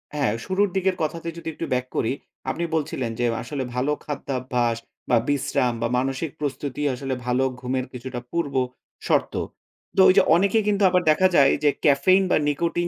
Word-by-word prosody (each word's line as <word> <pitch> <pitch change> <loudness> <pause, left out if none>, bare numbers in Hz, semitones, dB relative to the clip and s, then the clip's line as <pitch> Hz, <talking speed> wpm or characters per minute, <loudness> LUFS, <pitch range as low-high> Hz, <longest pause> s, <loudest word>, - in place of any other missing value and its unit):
হ্যাঁ, 140 -7 +1
শুরুর 200 +2 +1
দিকের 190 0 +1
কথাতে 165 +2 -3
যদি 170 - -9
একটু 165 - -5
ব্যাক 125 0 0
করি, 115 - +1 0.4
আপনি 160 +6 -2
বলছিলেন 140 -6 -2
যে, 120 - +2 0.2
আসলে 135 +2 -4
ভালো 130 +4 +1
খাদ্যাভ্যাস 125 -5 -1 0.3
বা 120 - +5
বিশ্রাম 130 -3 +1
বা 115 - +1
মানসিক 135 +4 -1
প্রস্তুতি 145 -1 -3
আসলে 135 +1 -3
ভালো 125 +1 +1 0.2
ঘুমের 130 +1 -2
কিছুটা 125 0 -6
পূর্বশর্ত। 135 -6 -2 0.6
তো, - - +7
ওই 185 - +7
যে - - +9
অনেকেই 200 +5 +3
কিন্তু 205 -1 +2
আবার 180 0 +3
দেখা 170 +5 +4
যায় 135 -3 +6
যে, 150 - +5 0.2
ক্যাফেইন 185 +7 +5
বা - - +5
নিকোটিন 170 +4 0
140 Hz, 170 wpm, -24 LUFS, 125-170 Hz, 0.6 s, যে